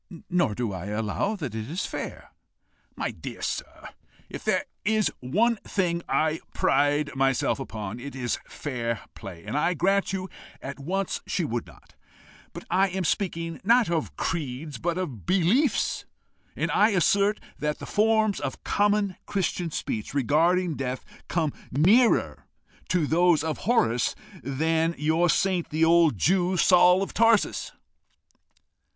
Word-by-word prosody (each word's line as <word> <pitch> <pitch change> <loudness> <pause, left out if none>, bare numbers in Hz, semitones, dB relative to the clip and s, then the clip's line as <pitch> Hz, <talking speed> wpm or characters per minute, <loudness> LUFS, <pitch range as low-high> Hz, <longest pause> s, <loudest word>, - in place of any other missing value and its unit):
Nor 175 -12 +2
do 115 -4 -2
I 95 +1 -6
allow 110 - -1
that 145 - -5
it 110 +2 -5
is 170 +5 -2
fair." - - -6 0.6
"My - - -2
dear - - -8
sir, - - -5 0.4
if - - -7
there - - +1 0.2
is 215 -2 +2
one 215 - +1
thing 175 -5 -1
I 155 0 +1 0.2
pride 145 0 +2
myself 135 0 +1
upon, 110 -4 -6
it 140 +3 -8
is 125 -2 -2
fair 115 -5 -4
play, 90 -5 -10
and 110 - -4
I 170 +4 +1
grant 195 +5 +1
you 190 -1 -3 0.3
at 140 +1 -7
once 190 +7 -2
she 175 - -1
would 120 -4 -3
not. - - -18 0.6
But - - -9
I 190 +2 +4
am 185 0 -2
speaking, 165 -3 -2
not 230 -1 +4
of 160 -3 -2
creeds, 145 -3 -3
but 175 +1 -1
of 140 - -5
beliefs. 195 - +2 0.5
And - - -1
I 210 +2 +4
assert 200 +4 +3 0.2
that 150 0 -1
the - - -8
forms 215 -1 +2
of - - -5
common 205 -2 +1
Christian 180 -3 -1
speech 115 -5 -4
regarding 165 +5 +2
death 130 -1 -4 0.2
come 160 -4 0 0.2
nearer 210 - +3 0.4
those 170 -1 +3
of 160 -2 -2
Horace 120 - +2 0.3
than 160 +4 0
your 160 +4 +2
saint, 185 0 +1
the 160 +1 +2
old 165 -6 +4
Jew, 180 - +2
Saul 180 +1 +5
of - - -6
Tarsus." 230 -2 +2
165 Hz, 145 wpm, -26 LUFS, 140-190 Hz, 0.6 s, Saul